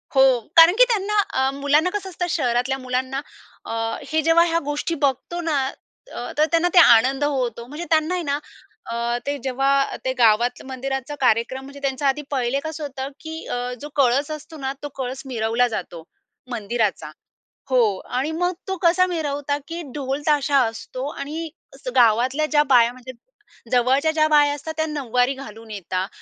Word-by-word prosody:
हो. 265 - +7 0.3
कारण 330 +3 +9
की - - +8
त्यांना 420 -2 0 0.2
अ, 265 0 +2
मुलांना 285 +5 +2
कसं 385 0 -4
असतं, 355 0 -3
शहरातल्या 255 -3 0
मुलांना 260 +1 -2 0.4
अ, - - -6 0.4
हे 315 0 +2
जेव्हा 330 +2 +4
ह्या 335 0 +1
गोष्टी 295 +3 -2
बघतो 275 +6 -2
ना 325 -4 0 0.5
अ, 240 - -6
तर 305 - +5
त्यांना 335 +1 +3
ते 360 - +8
आनंद 260 0 +6
होतो. 250 -5 -1
म्हणजे 300 +6 -6
त्यांना 315 +2 +2
आहे 355 - -2
ना 285 -1 -1 0.5
अ, 235 +1 -1
ते 285 0 -2
जेव्हा 275 +1 +1
ते 260 - 0
गावातलं 235 +2 +3
मंदिराचा 270 +2 -4
कार्यक्रम 250 +2 +1
म्हणजे 280 +1 -11
त्यांचा 275 +1 -1
आधी 275 +2 +1
पहिले 260 0 0
कसं 315 -1 -5
होतं, 270 -1 -5
की 320 0 -7
अ, 245 0 -3
जो 295 - -7
कळस 275 +2 +2
असतो 305 +1 -8
ना, 270 -2 -3
तो 290 - -4
कळस 260 0 -4
मिरवला 235 -1 +1
जातो, 175 -7 -6 0.5
मंदिराचा. 220 -2 -2 0.6
हो. 255 -2 +4 0.2
आणि 270 +5 -3
मग 355 +3 0
तो 380 - -1
कसा 365 +1 +4
मिरवतात, 290 -4 -2
की 335 +1 -5
ढोल 275 0 -3
ताशा 290 -1 +3
असतो 255 +4 -5
आणि 310 +3 -5 0.3
असं - - -7
गावातल्या 245 +6 +3
ज्या 300 -1 +3
बाया 235 -1 +6
म्हणजे 255 0 -10 0.6
जवळच्या 265 +5 +3
ज्या 310 -1 +2
बाया 295 -1 +4
असतात 315 +3 -7
त्या 315 - +1
नऊवारी 265 -4 0
घालून 225 -4 -11
येतात. 185 -1 -3
275 Hz, 170 wpm, -22 LUFS, 250-310 Hz, 0.6 s, कारण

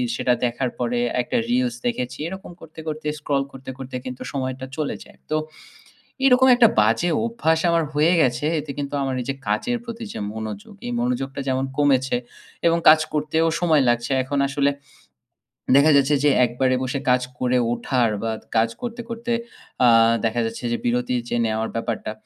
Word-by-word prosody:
সেটা 125 - +1
দেখার 120 +1 -1
পরে 120 0 0 0.2
একটা 245 - -2
reels 245 -1 +1
দেখেছি, 130 - -3
এরকম 190 0 -8
করতে, 160 0 -12
করতে, 155 0 -4
scroll 140 -2 0
করতে, 130 0 -10
করতে, 135 -1 -8
কিন্তু 130 0 -7
সময়টা 130 -1 -3
চলে 150 -2 -2
যায়। - - -19
তো 155 - 0 0.9
এরকম 260 0 +6
একটা 235 -3 +7
বাজে 115 +11 +2 0.2
অভ্যাস 160 -9 +1
আমার 165 -1 +2
হয়ে 155 +4 +4
গেছে। 125 +1 +1
এতে 145 -1 -9
কিন্তু 140 0 -4
আমার 135 -1 -1
এই - - -10
যে - - -2
কাজের 240 - 0
প্রতি 230 0 -6
যে - - -6
মনোযোগ, 110 - -7
এই 245 - -3
মনোযোগটা 145 - -2
যেমন 130 +1 0
কমেছে 135 -3 +3 0.5
এবং 170 0 +4
কাজ 155 0 +8
করতেও 155 +2 +1
সময় 160 -5 +4
লাগছে। 120 +2 +1
এখন 140 +2 -2
আসলে 140 0 +1 1.1
দেখা 150 +3 +6
যাচ্ছে 140 +1 +4
যে 145 - +5
একবারে 130 +2 +1
বসে 135 +1 -2
কাজ 125 0 +3 0.2
করে 125 0 +1
ওঠার 120 -1 +1
বা 115 0 -1 0.2
কাজ 115 +1 +4
করতে, 240 0 -5
করতে, 235 +1 -3 0.5
আ - - +7 0.4
দেখা 115 +1 +1
যাচ্ছে 115 +2 -6
যে - - +1
বিরতি 125 +1 0
যে - - -1
নেওয়ার 110 0 -1
ব্যাপারটা? 115 -2 -3
135 Hz, 175 wpm, -22 LUFS, 125-160 Hz, 1.1 s, কাজ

